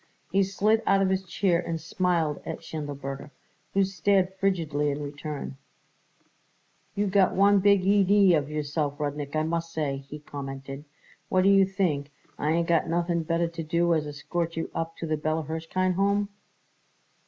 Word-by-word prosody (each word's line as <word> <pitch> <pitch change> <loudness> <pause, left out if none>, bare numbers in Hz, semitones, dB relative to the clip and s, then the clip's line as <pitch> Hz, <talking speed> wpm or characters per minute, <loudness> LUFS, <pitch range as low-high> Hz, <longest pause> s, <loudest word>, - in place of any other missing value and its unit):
He 195 - +3
slid 205 +3 +2
out 195 0 +4
of 190 - +1
his 190 0 0
chair 175 -1 +1
and 170 -2 -3
smiled 165 -2 0
at - - -6
Schindelberger, 140 -2 -6 0.5
who 195 - +5
stared 190 0 +1
frigidly 165 -7 0
in 145 +1 -3
return. 145 -1 -6 1.4
"You 205 - +1
got 195 -1 +3
a 200 +1 +6
big 200 0 +4
idee 200 -1 +5
of 150 -3 +1
yourself, 150 -1 -2
Rudnik, 145 0 -3
I 155 - +2
must 165 +1 -2
say," 145 -4 -1
he 140 +2 -9
commented. 135 -1 -7 0.4
"What 185 0 +3
do 195 - +5
you 195 -1 +6
think, 165 -7 -1 0.3
I 150 - 0
ain't 165 +1 +1
got 170 0 +2
nothing 170 0 0
better 165 +1 0
to 170 0 -6
do 170 +2 +1
as 155 -2 0
escort 165 +3 -3
you 165 - -3
up 165 0 -4
to - - -4
the 155 -1 0
Bella 155 +1 -1
Hirshkind 165 +4 -1
Home?" 200 +2 +1
165 Hz, 165 wpm, -27 LUFS, 150-190 Hz, 1.4 s, a